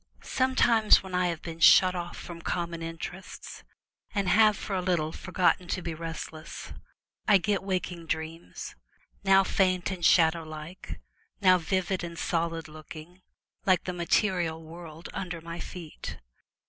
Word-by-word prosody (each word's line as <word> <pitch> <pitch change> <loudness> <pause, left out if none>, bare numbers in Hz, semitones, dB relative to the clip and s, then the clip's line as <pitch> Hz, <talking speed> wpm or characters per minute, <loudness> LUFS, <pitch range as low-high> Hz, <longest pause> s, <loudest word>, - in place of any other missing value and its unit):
Sometimes 240 -5 +4
when 190 -1 -9
I 180 0 +2
have 170 -2 -3
been 165 -1 -7
shut 185 +2 +7
off 175 -1 -5
from 170 -1 -8
common 170 -1 -3
interests, 165 +3 -7 0.5
and 200 -2 +1
have 215 -1 +5
for 195 - -4
a 185 - 0
little 175 -4 0
forgotten 180 0 +1
to 185 - -2
be 165 - -3
restless, 160 0 -7 0.5
I 205 - +7
get 200 +1 0
waking 180 -3 -3
dreams, 160 - -5 0.5
now 195 0 +6
faint 185 -1 +1
and 185 -2 -5
shadow 165 0 +5
like, 155 +3 -8 0.4
now 185 -2 +5
vivid 185 +2 -1
and 170 -1 -6
solid 165 -2 -1
looking, 155 +3 -11 0.5
like 185 -2 +4
the 180 - -3
material 175 -2 +1
world 165 0 -10
under 180 -3 -4
my 170 +1 -7
feet. 170 -4 -7
175 Hz, 145 wpm, -28 LUFS, 165-185 Hz, 0.5 s, shut